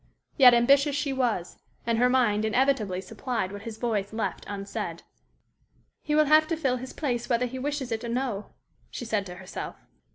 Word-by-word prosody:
Yet, 250 -4 +8
ambitious 275 +4 +4
she 285 -1 -1
was, 235 -9 -1 0.3
and 230 -1 +1
her 250 +1 +4
mind 235 -5 +2
inevitably 220 -5 +1
supplied 225 -1 -3
what 200 0 -7
his 220 0 -7
voice 215 -4 -1
left 220 0 -3
unsaid. 200 -1 -5 1.0
"He 300 - -1
will 305 0 +5
have 310 +1 +5
to 330 0 -1
fill 265 -5 0
his 255 +1 -7
place 245 -6 -2
whether 240 0 +2
he 260 +1 -5
wishes 280 -2 -3
it 225 +1 -2
or 235 - -4
no," 235 -4 -2 0.4
she 245 - -6
said 210 -3 -1
to 180 - -8
herself. 185 +1 -7
240 Hz, 185 wpm, -27 LUFS, 215-270 Hz, 1.0 s, Yet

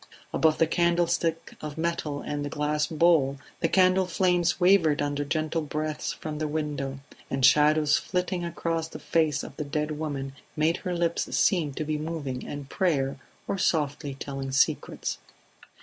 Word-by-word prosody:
Above 160 -1 +3
the 165 - +4
candlestick 170 0 +1
of 150 0 -6
metal 160 -3 -2
and 145 0 -3
the 145 - -3
glass 150 +1 0
bowl 155 -4 +3 0.2
the 165 - +1
candle 185 0 +4
flames 180 -1 +2
wavered 175 -5 +4
under 145 0 -1
gentle 155 +2 -1
breaths 155 0 -3
from 155 -3 -6
the 155 - -1
window, 145 -3 -3 0.3
and 135 -1 +2
shadows 150 +1 +5
flitting 180 -1 -2
across 165 -1 -2
the - - -9
face 155 -4 +1
of - - -9
the 150 - -2
dead 150 +1 -2
woman 140 -3 -3 0.2
made 160 +2 +2
her 180 -1 -3
lips 170 -1 0
seem 165 -7 +2
to 145 - -4
be 155 0 -1
moving 150 -5 -4
in 145 -1 -6
prayer 140 -4 0 0.3
or 195 - -2
softly 145 -5 0
telling 135 -1 -5
secrets. 135 - 0
155 Hz, 160 wpm, -27 LUFS, 145-170 Hz, 0.3 s, shadows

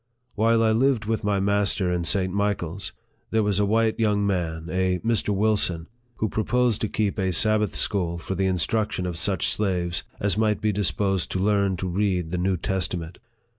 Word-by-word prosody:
While 115 +1 +2
I 110 - +3
lived 120 -1 +2
with 110 0 -2
my 100 -1 +1
master 100 -2 +1
in 90 -1 -1
St. 95 0 +2
Michael's, 100 -3 -2 0.4
there 110 -1 +1
was 105 -1 0
a 100 - +2
white 110 +1 +1
young 105 -2 +1
man, 85 -4 -2
a 95 0 +1
Mr. 115 -2 +1
Wilson, 100 -5 0 0.3
who 110 - -1
proposed 115 +1 0
to 110 - -1
keep 105 0 -1
a 95 -1 0
Sabbath 105 +3 +2
school 85 -4 +1
for 85 - -5
the 95 +1 0
instruction 100 +2 -1
of 90 -2 -3
such 95 +1 +1
slaves 90 -4 -1 0.2
as 100 0 0
might 110 -1 +1
be 110 -1 0
disposed 95 -1 0
to 95 - -1
learn 100 -1 +1
to 95 - -3
read 90 -3 -1
the 90 - -2
New 95 +1 0
Testament. 90 -2 -3
100 Hz, 185 wpm, -24 LUFS, 90-105 Hz, 0.4 s, I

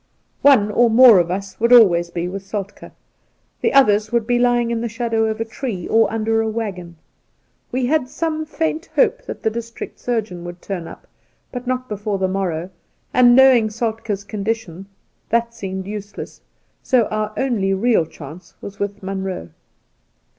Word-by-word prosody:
One 235 -7 +5
or 235 +2 +4
more 230 -3 +8
of 170 -1 0
us 195 +2 -5
would 235 +2 +2
always 175 -8 +6
be 170 0 -3
with 195 +2 -5
Soltk^; 200 0 -7 0.7
the - - +2
others 215 -6 +4
would 235 -2 +1
be 245 +1 +1
lying 240 -1 +2
in 230 -1 -1
the 235 - -2
shadow 230 0 -1
of 220 0 -2
a 225 - -1
tree 225 -5 -5
Soltke - - -8
69 - - +2
or - - +2
under 225 0 0
a 220 - -1
waggon. 195 -6 -5 0.8
We 255 0 0
had 255 -1 0
some 315 +2 -2
faint 320 +1 -3
hope - - +2
that - - -7
the 220 - +1
district 230 +1 -7
surgeon 215 -8 -3
would 175 0 -8
turn 175 -4 -5
up, - - -12 0.5
but 250 0 -7
not 255 0 -2
before 210 -1 -3
the 190 0 0
morrow, 185 -2 -3 0.4
and, 245 -1 +6
knowing 260 -4 +6
Soltk^'s 220 -2 -3
condition, 200 -4 -4 0.4
that 235 0 0
seemed 190 -3 -5
useless, 205 0 -8 0.4
so 255 -2 +3
that - - -6
our 215 0 -1
only 230 -8 0
real 210 -5 +2
chance 160 +4 -12
was 200 0 -10
with 200 0 -4
Munroe. 190 - -4
220 Hz, 175 wpm, -20 LUFS, 195-240 Hz, 0.8 s, more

